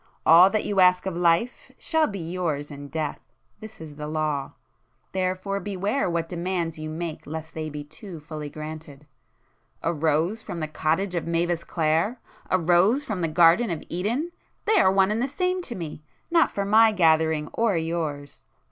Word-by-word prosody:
All 170 +4 +8
that 215 +1 -1
you 200 -2 0
ask 180 0 +5
of 190 -3 -3
life 175 +7 +1
shall 320 -1 +2
be 200 - -5
yours 165 -4 -3
in 145 0 -8
death!—this 160 +8 -7
is 155 -2 -10
the 150 0 -5
law,—therefore 185 +5 -4
beware 200 +5 -1
what 170 -1 -1
demands 170 -2 -3
you 155 0 -5
make 160 0 -5
lest 160 +1 -6
they 155 -1 -4
be 150 0 -6
too 170 +3 -10
fully 150 -1 -7
granted! 155 -1 -9 0.8
A - - +1
rose 160 +7 0
from 175 - -6
the 155 - -2
cottage 160 +5 -1
of 170 -2 -2
Mavis 170 0 0
Clare?—a 170 +4 -1
rose 180 - +3
from 215 -9 -4
the 165 - +1
garden 170 +8 +4
of 165 -3 -3
Eden!—they 295 - -1
are 190 - +5
one 195 +1 +3
and 220 +2 0
the 265 - +1
same 365 +6 -1
to 250 -9 -6
me! 160 -4 -6 0.3
Not 335 -1 +4
for 200 - -3
my 220 +2 +6
gathering 160 -4 +2
or 225 -6 +1
yours! 160 -4 -4
170 Hz, 165 wpm, -25 LUFS, 155-200 Hz, 0.8 s, All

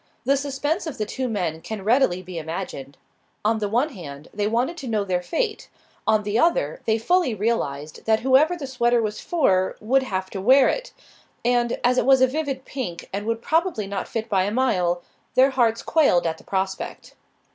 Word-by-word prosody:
The 275 - +4
suspense 290 +5 -2
of 285 -4 -5
the 215 - -1
two 260 +4 -3
men 175 -8 -2
can 215 0 -6
readily 215 -5 +2
be 180 -2 -6
imagined. 160 -4 -6 0.5
On 220 +1 +2
the 205 -1 -1
one 245 +8 +1
hand, 150 - -10
they 205 0 0
wanted 245 +9 0
to 270 - -7
know 215 -3 0
their 180 -2 -1
fate; 430 - -2 0.4
on 215 -1 +3
the 210 +2 0
other, - - +1
they 220 0 +2
fully 265 +1 +1
realized 155 -9 -2
that 220 0 +3
whoever 270 +7 +4
the 295 - -5
sweater 240 -2 +2
was 215 -2 -2
for 190 - +1
would 260 +5 +2
have 190 -7 -3
to 195 - -4
wear 260 +5 +6
it. - - -3 0.5
And, 240 -1 +1
as 250 +1 +3
it - - -1
was 270 -1 +6
a 260 - +6
vivid 270 -1 -3
pink 240 -11 -5
and 205 +2 -3
would 230 0 -2
probably 325 - +1
not 195 0 -4
fit 225 0 -4
by 190 -4 +2
a 205 - -1
mile, 180 -8 +1 0.3
their 265 +2 +5
hearts 235 -3 +1
quailed 280 - +3
at 160 -1 -2
the - - -16
prospect. 190 0 -4
225 Hz, 200 wpm, -23 LUFS, 190-265 Hz, 0.5 s, wear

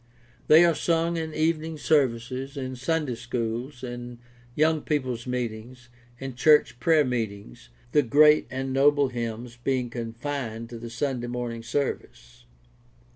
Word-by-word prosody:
They 160 +3 +8
are 170 - +4
sung 165 +1 0
in 160 -1 -3
evening 160 0 0
services, 135 -2 0
in 130 -1 -4
Sunday 145 +1 -1
schools, 120 +2 -4
in 120 -1 -6 0.4
young 155 0 +2
people's 130 -5 -2
meetings, 120 0 -5 0.3
in 135 0 -6
church 130 -2 +4
prayer 160 -2 +4
meetings 100 - -4
— 120 - -30
the 150 - +5
great 150 +4 +5
and 130 0 -3
noble 140 0 +4
hymns 120 0 -5
being 130 -3 0
confined 115 0 -5
to 115 - -7
the 120 0 -7
Sunday 120 0 -2
morn 120 0 -3
ing 115 0 -7
service. 115 - -4
125 Hz, 140 wpm, -26 LUFS, 120-145 Hz, 0.4 s, They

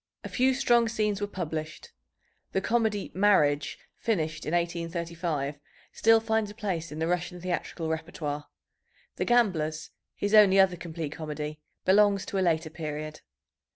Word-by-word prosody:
A - - -6
few 260 +1 +2
strong 240 -3 +3
scenes 210 -3 -1
were 205 - 0
published. 160 -4 -5 0.6
The - - +2
comedy 220 -2 0
Marriage, 150 -8 +3 0.2
finished 160 -10 -2
in 155 - -2
1835, 170 -4 -2 0.3
still 225 0 +5
finds 220 -1 0
a 205 - -11
place 185 -8 -3
in 150 - -6
the 160 - 0
Russian 180 +1 -2
theatrical 175 -2 -3
repertoire. 160 -2 -4 0.7
The - - 0
Gamblers, 175 -11 +1 0.2
his 205 +1 -2
only 200 -3 +7
other 190 -2 +5
complete 165 -3 -5
comedy, 150 -1 -5 0.3
belongs 200 +1 +4
to 195 - -2
a 185 - +2
later 160 -1 -1
period. 155 -1 -5
175 Hz, 145 wpm, -28 LUFS, 155-205 Hz, 0.7 s, only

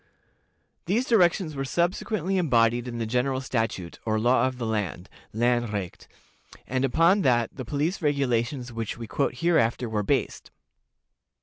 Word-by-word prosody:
These 225 +8 +1
directions 180 - +2
were 135 - -2
subsequently 180 +5 -1
embodied 120 -7 +2
in 120 -1 -5
the 115 - -2
general 125 +3 0
statute, 115 -9 -3
or 110 -1 0
law 125 +3 +3
of 130 -1 -5
the 120 - -3
land 105 -4 -3 0.2
(landrecht), 115 -5 -1 0.6
and 130 +1 -1
upon 165 +9 +3
that 120 -6 +1
the 130 - -6
police 150 - -1
regulations 130 -4 0
which 115 -1 -4
we 115 - -6
quote 110 - -1
hereafter 125 -6 +1
were 110 -2 -1
based. 100 - -1
125 Hz, 140 wpm, -26 LUFS, 115-155 Hz, 0.6 s, law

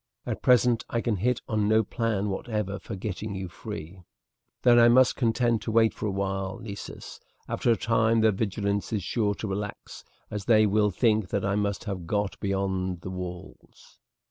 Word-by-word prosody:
At - - -4
present 125 -2 +4
I 115 - 0
can 115 -3 0
hit 125 +6 0
on 105 -2 0
no 110 +1 +4
plan 105 -2 -1
whatever 100 -1 -3
for 110 - -7
getting 100 +1 -5
you 95 -1 -4
free." 85 +1 -8 0.6
"Then 120 -1 +6
I 120 0 +7
must 130 +1 +5
be - - -17
content 115 -2 +2
to 110 - -3
wait 110 0 +4
for 110 - -4
a - - -1
while, 95 -1 -2
Nessus. 100 -2 -8 0.3
After - - -1
a - - +4
time 115 0 +2
their 110 0 +5
vigilance 100 0 -2
is 105 -4 -1
sure 105 +1 0
to 110 - -5
relax, 100 +1 -6 0.3
as 105 -2 -4
they 110 -2 +5
will 105 0 +3
think 105 0 +1
that 100 -1 -1
I 100 - +1
must 100 -1 -1
have 95 -5 -5
got 105 +1 -1
beyond 95 -3 -1
the 90 - -6
walls." 90 0 -9
105 Hz, 190 wpm, -27 LUFS, 95-115 Hz, 0.6 s, I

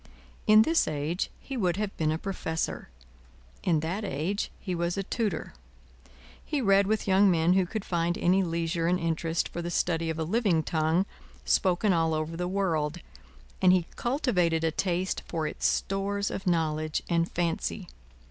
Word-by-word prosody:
In 215 +1 +8
this 325 +6 +2
age, 155 +4 -2
he 270 - -7
would 185 -7 0
have 205 -1 -3
been 155 -1 0
a 155 - 0
Professor; 160 -3 -3 0.7
in 160 -4 +1
that 180 +7 -3
age, 190 +4 -2
he 185 - -4
was 175 +1 -1
a 195 - -1
Tutor. 205 -5 -2 0.9
He 300 - -2
read 195 -4 +4
with 215 0 0
young 195 +1 +5
men 170 0 +3
who 185 -1 +2
could 215 +2 -4
find 170 0 0
any 185 +2 +3
leisure 165 -1 -1
and 180 +1 +2
interest 165 0 -1
for 170 - -5
the 170 - -4
study 165 -1 0
of 160 - -2
a 160 - -1
living 185 -3 +1
tongue 160 +4 +1 0.4
spoken 180 - +2
all 165 -1 +2
over 155 +1 -3
the 180 +1 -2
world, 175 -5 0 0.6
and 185 - +6
he 180 -2 +3
cultivated 180 - +1
a 160 - +2
taste 180 +2 -1
for 160 -2 -2
its 155 - 0
stores 200 +1 -1
of 195 - -5
knowledge 155 -2 0
and 170 0 +1
fancy. 175 +2 -2
175 Hz, 170 wpm, -28 LUFS, 165-195 Hz, 0.9 s, In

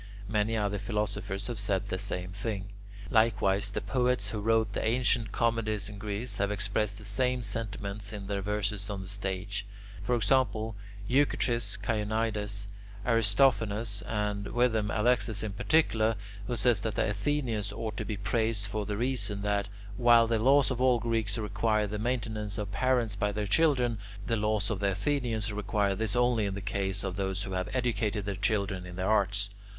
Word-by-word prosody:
Many 110 +2 +1
other 100 -1 0
philosophers 100 -2 -2
have 120 -3 -4
said 100 -1 -1
the 95 - -2
same 90 -2 -4
thing. 100 0 -4 0.4
Likewise 100 -4 +3
the 100 - -3
poets 125 -5 +1
who 105 - -3
wrote 110 +1 +2
the - - -1
ancient 120 0 +2
comedies 110 -3 0
in 105 -1 -9
Greek 105 +3 -3
have 100 0 +2
expressed 100 0 0
the 105 - -10
same 125 +4 +1
sentiments 105 -1 -2
in 105 -2 -6
their 100 0 -2
verses 105 0 -2
on 100 -2 -4
the - - -9
stage: 100 +1 -3 0.4
for 120 +5 +1
example, 110 -2 +1 0.3
Eucrates, 120 -6 +1
Chionides, 105 -1 -1 0.4
Aristophanes, 115 -2 +2
and 105 -1 -1
with 120 0 +2
them 105 -2 0
Alexis 110 -1 +1
in 105 -2 -3
particular, 115 -3 +2 0.3
who 120 - -1
says 110 -1 +3
that 110 -2 -2
the - - +1
Athenians 110 -1 -1
ought 110 0 -4
to - - -1
be 105 - -3
praised 110 0 0
for 105 0 -3
the 105 -1 -2
reason 105 -5 -1
that, 100 -1 0 0.3
while 120 -1 +6
the 115 -1 +1
laws 135 +3 +4
of 125 -1 -2
all 130 -1 +5
Greeks 115 -3 0
require 110 0 +1
the 105 +1 -4
maintenance 110 -3 -2
of 105 -2 -3
parents 120 +1 +1
by 105 0 0
their 105 0 -2
children, 125 -2 +3 0.3
the 115 - +1
laws 105 -1 0
of 105 - -2
the 100 -1 +2
Athenians 110 -1 -1
require 100 -1 0
this 110 +2 -1
only 120 -3 +3
in 95 - -3
the - - -3
case 95 -1 -2
of 95 -1 -3
those 95 0 -1
who 95 - -5
have 90 -1 -2
educated 115 -4 0
their 100 - -1
children 100 -2 0
in 90 - -8
the 95 - -3
arts. 100 0 +1
105 Hz, 175 wpm, -30 LUFS, 100-115 Hz, 0.4 s, while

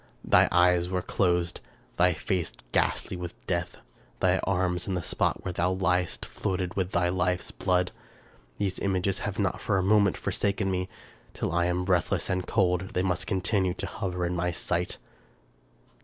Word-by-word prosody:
Thy - - +5
eyes 90 0 +4
were 90 -1 -1
closed 90 -2 0 0.2
— - - -32
thy 90 0 +4
face 85 -4 -1 0.2
ghastly - - 0
with 90 -1 -7
death 85 -1 -2 0.2
— - - -31
thy 95 0 +3
arms, 90 -2 0
and 95 -2 -1
the 90 - -3
spot - - 0
where - - -1
thou 90 +1 +1
lyedst, 90 -1 0
floated 90 -2 -2
in 95 -2 0
thy 90 -1 +1
life's 90 0 0
blood! 90 0 +1 0.7
These 95 -2 -1
images 95 0 0
have 105 -2 -4
not 100 -3 0
for 100 - +1
a 95 - +1
moment 100 0 +4
forsaken 100 -1 -1
me. 90 0 -2 0.5
Till - - -2
I 85 +1 +2
am 90 +1 0
breathless 90 -3 +1
and 90 0 -1
cold, 95 -3 +1
they 90 - +2
must 90 -3 0
continue 95 -1 +1
to - - -4
hover 90 -3 -3
in 90 +1 -1
my 90 0 0
sight. 90 0 -1
90 Hz, 175 wpm, -28 LUFS, 90-95 Hz, 0.7 s, Thy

